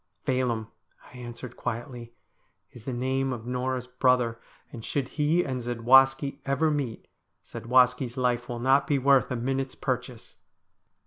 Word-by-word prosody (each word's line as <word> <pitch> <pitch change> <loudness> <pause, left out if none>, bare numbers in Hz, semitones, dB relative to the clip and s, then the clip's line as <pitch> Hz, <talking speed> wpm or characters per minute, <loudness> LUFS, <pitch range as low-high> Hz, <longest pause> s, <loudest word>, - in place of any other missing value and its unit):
' - - -50
Phelim,' 125 -4 0 0.5
I 125 - -11
answered 120 0 -8
quietly, 120 0 -6 0.3
' - - -45
is 120 -2 -13
the 135 - -3
name 130 +2 -1
of 120 -3 -6
Norah's 125 0 -2
brother, 125 -2 +1 0.3
and 115 -4 -8
should 135 +1 -2
he 155 +4 +1
and 130 -2 -3
Zadwaski 135 +4 +3
ever 155 +3 +1
meet, 135 -7 -3 0.4
Zadwaski's 125 +1 +1
life 120 -1 0
will 120 - -4
not 130 +4 +3
be 145 - +2
worth 135 0 +3
a 125 - -2
minute's 130 +2 -2
purchase.' 125 -3 -4
125 Hz, 150 wpm, -27 LUFS, 120-135 Hz, 0.5 s, Zadwaski